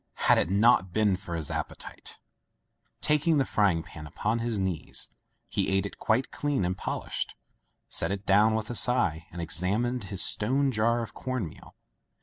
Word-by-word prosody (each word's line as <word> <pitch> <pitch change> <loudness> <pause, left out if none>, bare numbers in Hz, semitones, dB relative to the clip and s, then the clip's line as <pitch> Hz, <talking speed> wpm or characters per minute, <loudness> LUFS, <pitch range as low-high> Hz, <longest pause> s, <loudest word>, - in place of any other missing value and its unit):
Had - - +6
it - - +1
not 100 -1 +4
been 105 -1 +2
for 90 -2 -6
his 80 -3 -3
appetite! - - -6 0.8
Taking 150 +1 +3
the 135 - +2
frying 95 -9 +2
pan 75 -1 -10
upon 110 +9 -1
his 115 -2 -1
knees, 95 -5 -2 0.4
he - - 0
ate 95 +1 +1
it 100 - -8
quite 120 +4 +1
clean 145 -9 -1
and 90 +1 -1
polished, - - -4 0.5
set - - 0
it 100 0 -4
down 105 +3 +4
with 110 +1 -3
a - - -4
sigh, 100 -11 +2
and 85 - -8
examined 100 - -1
his 95 -2 +1
stone 135 +6 +2
jar 115 +1 +1
of 115 - -8
corn 130 -8 -3
meal. - - -14
105 Hz, 170 wpm, -28 LUFS, 90-120 Hz, 0.8 s, Had